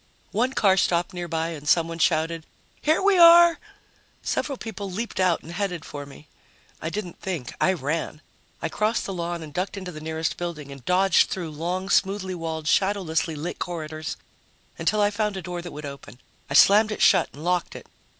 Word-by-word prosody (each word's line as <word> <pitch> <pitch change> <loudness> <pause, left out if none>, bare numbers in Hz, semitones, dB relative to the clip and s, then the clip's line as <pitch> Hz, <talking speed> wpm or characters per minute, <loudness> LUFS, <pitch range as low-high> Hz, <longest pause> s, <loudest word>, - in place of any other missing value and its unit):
One 250 +5 0
car 195 -5 +3
stopped 175 0 +1
nearby 165 -2 -2
and 150 -3 -8
someone 165 +1 +2
shouted, 160 0 +1 0.3
"Here 315 +4 +2
we 395 -2 +4
are!" 340 0 +8 0.6
Several 275 -3 -2
people 205 -4 -6
leaped 220 +4 -4
out 185 -3 +2
and 165 - -9
headed 180 -3 -3
for 145 -1 -7
me. 145 +1 -14 0.5
I 160 - -2
didn't 185 -1 -6
think. 170 -10 -4
I 185 - +4
ran. 155 -1 -3 0.4
I - - +1
crossed 215 +6 0
the 195 - -4
lawn 170 -1 -3
and 150 -2 -10
ducked 185 +2 -3
into 185 -2 -6
the 155 -2 -9
nearest 160 +1 -2
building 160 -5 -5
and 140 -2 -11
dodged 185 +1 +4
through 170 -4 -4
long, 175 +5 -3
smoothly 190 -1 +1
walled, 160 -2 -4
shadowlessly 175 -3 +1
lit 160 +4 -5
corridors 155 -3 -5 0.6
until 215 0 +1
I 205 0 +3
found 210 -1 -1
a - - -4
door 175 0 -5
that 175 0 -8
would 150 +1 -8
open. 140 -5 -10 0.3
I 140 - -2
slammed 210 +7 +6
it 210 - -1
shut 185 -4 +5
and 150 - -10
locked 180 -1 0
it. - - -9
175 Hz, 190 wpm, -25 LUFS, 160-195 Hz, 0.6 s, are